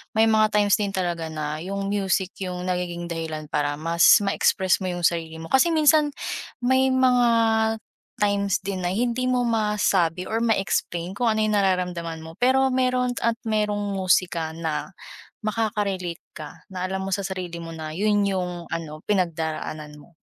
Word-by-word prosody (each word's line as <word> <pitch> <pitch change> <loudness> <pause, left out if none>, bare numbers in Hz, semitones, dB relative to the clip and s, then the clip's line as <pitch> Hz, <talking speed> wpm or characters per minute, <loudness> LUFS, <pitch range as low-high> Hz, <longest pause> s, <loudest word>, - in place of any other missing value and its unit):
may 220 +1 +5
mga 215 -1 +4
times 205 -1 +4
din 200 -1 -1
talaga 175 -3 -2
na 155 -1 -3
yung 195 +1 -3
music 195 -2 0
yung 180 0 -5
nagiging 175 -1 -3
dahilan 160 -2 -4
para 145 -1 0
mas 165 +1 +2 0.2
ma-express 190 -1 +2
mo 185 - -1
yung 175 - -5
sarili 160 -1 -4
mo. 165 - -7
Kasi 265 +6 +4
minsan, 305 -1 +4 0.5
may 260 +1 +3
mga 250 -2 +4 0.9
times 200 -2 +1
din 190 -1 -3
na 175 - 0
hindi 240 +3 0
mo 250 -1 +2
masabi 205 -6 +1
or 220 - 0
ma-explain 190 -5 0
kung 245 - 0
ano 215 0 0
yung 215 0 +1
nararamdaman 180 -4 -1
mo 160 0 -10
pero 265 +2 +4
meron 255 -1 +1
at 230 - +2
merong 210 -2 0
musika 180 -3 +1
na 165 +2 -3 0.5
makaka-relate 205 -5 -2 0.2
ka 155 - -10
na 185 -1 -3
alam 190 0 -3
mo - - -4
sa 200 - -3
sarili 180 -3 -5
mo 165 0 -7
na 160 -1 -6
yun 205 +2 +2
yung 180 -2 -3
ano, 155 -2 -5
pinagdaraanan 160 -5 -2
mo. 150 +3 -18
190 Hz, 165 wpm, -24 LUFS, 170-215 Hz, 0.9 s, may